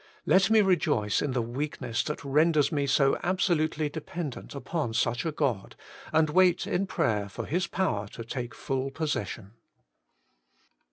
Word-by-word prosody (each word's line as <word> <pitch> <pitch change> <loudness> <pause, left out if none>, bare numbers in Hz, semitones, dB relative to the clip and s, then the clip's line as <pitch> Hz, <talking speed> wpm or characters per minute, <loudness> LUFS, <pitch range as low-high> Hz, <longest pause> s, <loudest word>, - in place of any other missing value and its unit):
Let 195 +2 +4
me 220 -1 +6
rejoice 150 - +2
in 145 -3 -1
the 125 -2 0
weakness 120 -1 -3
that 150 - -4
renders 150 +1 +3
me 145 -2 0
so 135 0 +3
absolutely 165 -4 +1
de 155 +2 -6
pendent 150 -4 -6
upon 140 -4 -3
such 120 +8 0
a - - 0
God, 130 -10 -2 0.4
and 155 -1 +3
wait 180 +1 +4
in 195 +2 -1
prayer 105 - 0
for - - -6
His 175 +3 -1
power 140 - -1
to 115 - -6
take 120 0 -5
full 135 0 -2
posses 145 -6 -2
sion. 100 -4 -8
145 Hz, 160 wpm, -28 LUFS, 120-170 Hz, 0.4 s, me